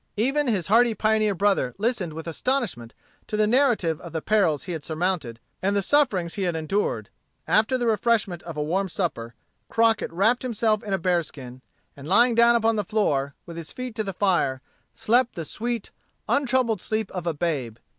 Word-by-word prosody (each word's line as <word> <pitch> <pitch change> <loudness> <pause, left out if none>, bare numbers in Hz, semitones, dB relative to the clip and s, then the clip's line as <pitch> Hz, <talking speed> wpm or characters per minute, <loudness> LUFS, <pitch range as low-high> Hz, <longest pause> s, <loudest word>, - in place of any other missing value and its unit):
Even 275 +6 +1
his 200 -8 0
hardy 230 +2 +4
pioneer 215 -1 +2
brother 195 -10 +1
listened 210 -7 -1
with 160 +1 -7
astonishment 170 - -2 0.3
to 215 - -3
the 215 - +3
narrative 220 - +2
of 170 -2 -10
the 160 - -2
perils 190 -9 +2
he 180 - -6
had 160 -4 -5
surmounted 160 -8 -2 0.2
and 200 +2 +1
the 200 - +1
sufferings 195 - +2
he 200 - -4
had 175 -3 0
endured. 160 +6 -2 0.4
After 220 +4 +3
the 245 - -2
refreshment 220 -5 +1
of 165 -3 -8
a 150 - 0
warm 190 +5 -1
supper, 125 -11 -3 0.3
Crockett 225 -1 +2
wrapped 210 +8 +2
himself 220 -3 0
in 205 - -7
a - - +2
bearskin, 155 -8 -3 0.3
and 140 +1 -10
lying 235 +7 +4
down 235 +1 +5
upon 225 -1 +2
the 210 - 0
floor, 145 -10 0
with 170 -1 -9
his 165 -2 -5
feet 255 -2 -6
to 215 - -2
the 195 - -3
fire, 175 -9 0 0.3
slept 245 +2 +2
the 165 - -5
sweet, 235 +4 -4 0.4
untroubled 255 -7 +1
sleep 215 -1 -2
of 180 -2 -5
a 170 - +1
babe. 140 -9 -2
200 Hz, 185 wpm, -24 LUFS, 165-230 Hz, 0.4 s, down